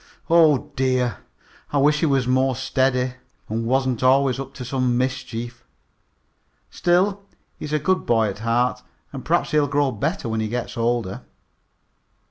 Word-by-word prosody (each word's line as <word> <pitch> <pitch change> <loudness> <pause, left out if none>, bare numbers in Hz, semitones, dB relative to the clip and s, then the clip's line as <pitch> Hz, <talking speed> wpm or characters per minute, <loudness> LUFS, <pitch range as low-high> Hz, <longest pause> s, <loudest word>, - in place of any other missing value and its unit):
Oh, 150 -3 +4
dear! 130 -2 0 0.5
I 145 - 0
wish 150 +2 +3
he 160 - +2
was 135 -3 +2
more 130 0 +2
steady, 130 -1 0 0.3
and 115 +1 -3
wasn't 130 -1 0
always 130 0 +3
up 135 0 -7
to 125 - -7
some 125 -1 0
mischief. 120 -2 -4 1.1
Still, 190 +3 +1 0.4
he's 150 - -6
a 155 - +2
good 185 +5 0
boy 115 -2 +3
at 100 0 -5
heart, 120 +2 0 0.3
and 135 - -6
perhaps 170 +2 0
he'll 150 -1 +3
grow 140 0 +1
better 140 - -2
when 110 0 -2
he 110 - -1
gets 120 +2 -4
older." 115 -4 -1
130 Hz, 150 wpm, -22 LUFS, 120-145 Hz, 1.1 s, Oh